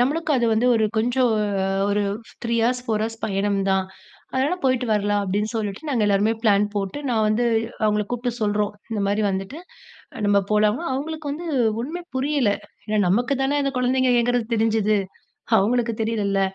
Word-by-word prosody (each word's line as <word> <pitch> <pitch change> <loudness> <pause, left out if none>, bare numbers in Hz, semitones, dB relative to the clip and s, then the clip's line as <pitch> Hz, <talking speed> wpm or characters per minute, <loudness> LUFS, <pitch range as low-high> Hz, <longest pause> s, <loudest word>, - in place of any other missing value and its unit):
நம்மளுக்கு 310 +6 0
அது 240 -2 +2
வந்து 220 +3 +2
ஒரு 220 - +2
கொஞ்சம் 245 +2 +2 0.6
ஒரு 205 0 +1 0.4
3 235 0 0
ஹார்ஸ், 245 +1 0
4 215 -2 0
ஹார்ஸ் 225 0 -6
பயணம் 200 -1 0
தான். 190 0 +1 0.5
அதனால 270 +6 +1
போயிட்டு 255 -1 +2
வரலாம் 205 -1 +1
அப்படின்னு 205 +3 -1
சொல்லிட்டு, 205 0 -3
நாங்க 250 -6 +1
எல்லாருமே 205 +2 +3
பிளான் 205 -2 +4
போட்டு, 195 +5 -2
நான் 220 -2 +2
வந்து 215 +3 +1 0.4
அவங்கள 210 0 +2
கூப்பிட்டு 245 0 -3
சொல்றோம். 205 0 0 0.2
'இந்த 220 -2 -2
மாதிரி 205 +2 +1
வந்துட்டு 195 +9 -4 0.7
நம்ம 205 0 +4
போலாம்?' 210 +3 +2
அவங்களுக்கு 300 +2 -4
வந்து 335 +4 -6 0.3
ஒண்ணுமே 320 +9 -5
புரியல. 270 -4 +1 0.4
ஏன்னா 215 0 0
நமக்கு 245 +9 +2
தானே 280 +2 +1
அந்த 275 - -1
குழந்தைங்க 255 +1 +2
ஏங்கறது 245 -1 0
தெரிஞ்சுது, 220 -1 +2 0.6
அவங்களுக்கு 230 +3 +1
தெரியலள்ல. 205 -3 0
225 Hz, 160 wpm, -23 LUFS, 205-250 Hz, 0.7 s, பிளான்